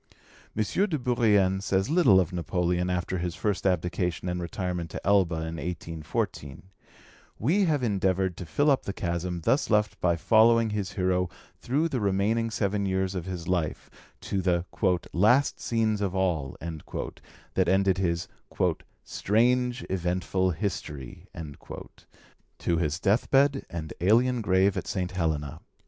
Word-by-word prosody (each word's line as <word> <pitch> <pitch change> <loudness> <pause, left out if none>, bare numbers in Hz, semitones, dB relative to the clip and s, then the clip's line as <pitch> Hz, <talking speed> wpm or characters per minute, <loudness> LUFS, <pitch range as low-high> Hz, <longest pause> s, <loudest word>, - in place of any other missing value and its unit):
M. 110 - +3
de 180 - 0
Bourrienne 105 -7 +2
says 95 -1 0
little 155 - +6
of 90 -1 -1
Napoleon 90 0 0
after 90 0 -1
his 85 0 -3
first 100 -2 -1
abdication 90 0 -1
and 90 0 -2
retirement 85 0 -3
to - - -7
Elba 95 -4 +3
in 80 +1 -4
1814: 80 -4 -4 0.7
we 180 - +2
have 150 -6 +1
endeavoured 95 -4 +1
to 90 - -7
fill 145 - +2
up 135 - +2
the 100 - -3
chasm 85 -1 -3
thus 135 - +1
left 105 -2 +1
by 85 -1 +3
following 115 +4 +4
his 105 -2 -3
hero 90 -1 +1 0.3
through 145 +7 0
the 135 -6 -2
remaining 105 +3 +1
seven 100 -2 -1
years 95 0 0
of 90 -3 -4
his 90 -2 -5
life, 90 -4 -2 0.3
to 95 - -2
the 90 -1 +1 0.5
"last 120 +10 +3
scenes 110 -3 0
of 95 -2 -1
all" 85 -8 -1 1.0
that - - +2
ended 95 0 +3
his 85 -2 0 0.8
"strange, 125 +4 +1
eventful 95 +1 0
history," 80 - -5 1.3
to 85 - 0
his 80 0 -1
deathbed 135 +8 +2
and 80 -2 -5
alien 120 +6 +3
grave 95 -1 +3
at - - -4
St. 90 -2 -2
Helena. 80 -6 -2
95 Hz, 140 wpm, -27 LUFS, 90-110 Hz, 1.3 s, little